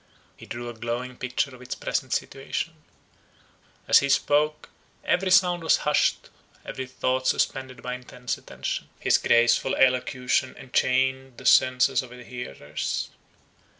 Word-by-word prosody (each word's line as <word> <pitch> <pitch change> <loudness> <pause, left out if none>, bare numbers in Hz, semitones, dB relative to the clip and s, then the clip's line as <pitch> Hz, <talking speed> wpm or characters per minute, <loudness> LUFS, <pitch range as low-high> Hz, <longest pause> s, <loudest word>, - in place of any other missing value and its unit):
He - - -14
drew 120 +1 -6
a 120 - -6
glowing 120 +3 -4
picture 125 +3 -2
of 125 - -13
its 125 - -5
present - - -3
situation. - - -3 1.1
As - - +7
he 140 - -1
spoke, 150 +2 +1 0.3
every 190 +1 +1
sound 180 -2 +4
was 160 - +4
hushed, 150 0 +1 0.3
every 130 -1 -5
thought 130 0 -1
suspended 130 -2 -1
by 125 - -3
intense 125 -1 -5
attention. - - -5
His - - +3
graceful 120 +2 +3
elocution 130 0 +1
enchained 130 0 0
the - - -11
senses 130 0 +4
of 130 - -11
his 125 0 -12
hearers. 75 - -5
130 Hz, 135 wpm, -25 LUFS, 125-135 Hz, 1.1 s, As